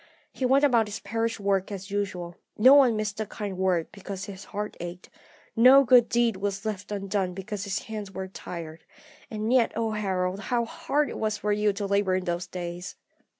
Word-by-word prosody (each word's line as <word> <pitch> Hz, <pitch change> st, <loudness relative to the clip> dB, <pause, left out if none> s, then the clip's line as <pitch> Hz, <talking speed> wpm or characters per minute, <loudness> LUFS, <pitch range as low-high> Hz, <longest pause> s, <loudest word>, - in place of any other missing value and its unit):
He 260 Hz, -, -1 dB
went 270 Hz, +3 st, +4 dB
about 235 Hz, -5 st, +3 dB
his 210 Hz, -, -5 dB
parish 225 Hz, +1 st, -2 dB
work 195 Hz, -1 st, 0 dB
as 195 Hz, 0 st, -7 dB
usual; 185 Hz, -4 st, -3 dB, 0.2 s
no 255 Hz, +6 st, +8 dB
one 265 Hz, -5 st, +6 dB
missed 215 Hz, -1 st, -3 dB
a 215 Hz, -, -1 dB
kind 205 Hz, -2 st, -5 dB
word 185 Hz, -3 st, 0 dB
because 200 Hz, -1 st, -7 dB
his 200 Hz, -2 st, -9 dB
heart 210 Hz, +1 st, -5 dB
ached, 175 Hz, +1 st, -8 dB, 0.4 s
no 255 Hz, +4 st, +8 dB
good 245 Hz, -2 st, +5 dB
deed 235 Hz, -3 st, +2 dB
was 200 Hz, +1 st, -3 dB
left 210 Hz, -2 st, -4 dB
undone 195 Hz, -2 st, -2 dB
because 200 Hz, +1 st, -5 dB
his 200 Hz, +1 st, -2 dB
hands 215 Hz, -3 st, -6 dB
were 190 Hz, 0 st, -5 dB
tired. 165 Hz, -3 st, -8 dB, 0.5 s
And 215 Hz, +2 st, -1 dB
yet, 245 Hz, -3 st, +4 dB
O 225 Hz, -1 st, -1 dB
Harold, 190 Hz, -3 st, -1 dB
how 235 Hz, +2 st, 0 dB
hard 300 Hz, +1 st, -1 dB
it -, -, -6 dB
was 215 Hz, -1 st, 0 dB
for 210 Hz, 0 st, -1 dB
you 210 Hz, 0 st, +2 dB
to 200 Hz, +1 st, -3 dB
labour 200 Hz, -1 st, +1 dB
in 185 Hz, -1 st, -2 dB
those 175 Hz, 0 st, -2 dB
days! 175 Hz, 0 st, -6 dB
205 Hz, 195 wpm, -27 LUFS, 190-225 Hz, 0.5 s, no